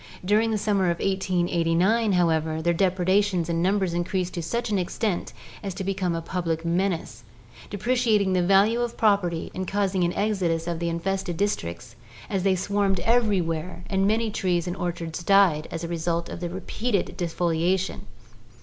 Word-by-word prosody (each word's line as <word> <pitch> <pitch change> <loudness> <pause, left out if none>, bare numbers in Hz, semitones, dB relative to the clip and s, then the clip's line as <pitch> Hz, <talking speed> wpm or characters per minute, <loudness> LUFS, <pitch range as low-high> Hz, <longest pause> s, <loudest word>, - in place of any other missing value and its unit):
During 215 +4 +3
the 220 - 0
summer 200 -2 +1
of 170 -1 +1
1889, 185 +3 +1
however, 160 -3 +1
their 170 +2 +1
depredations 185 0 +1
and 165 0 0
numbers 190 -1 +1
increased 180 +1 -1
to 175 - -3
such 235 +7 -2
an 200 - +2
extent 185 +1 -2 0.3
as 195 -3 -5
to 190 - -4
become 185 -2 -1
a 165 - -4
public 165 -2 -2
menace, 170 - -1 0.5
depre 210 +5 -1
ciating 215 -6 +2
the 180 - +2
value 200 +6 +4
of 240 -1 -3
property 195 -6 +1
and 185 0 -4
causing 195 -2 0
an 175 0 +1
exodus 185 -6 0
from 170 -1 -3
the 170 0 -1
infested 175 +1 -2
districts, 120 - -3 0.4
as 195 - 0
they 190 0 +2
swarmed 195 0 0
everywhere 185 -8 0
and 195 0 +2
many 220 +1 +1
trees 180 -4 0
and 175 0 -3
orchards 170 -2 -4
died 180 -5 +4
as 165 - -5
a - - -3
result 170 0 -2
of - - -6
the 175 -1 -3
repeated 200 +3 -2
defoliation. 175 +2 0
185 Hz, 170 wpm, -25 LUFS, 170-200 Hz, 0.5 s, value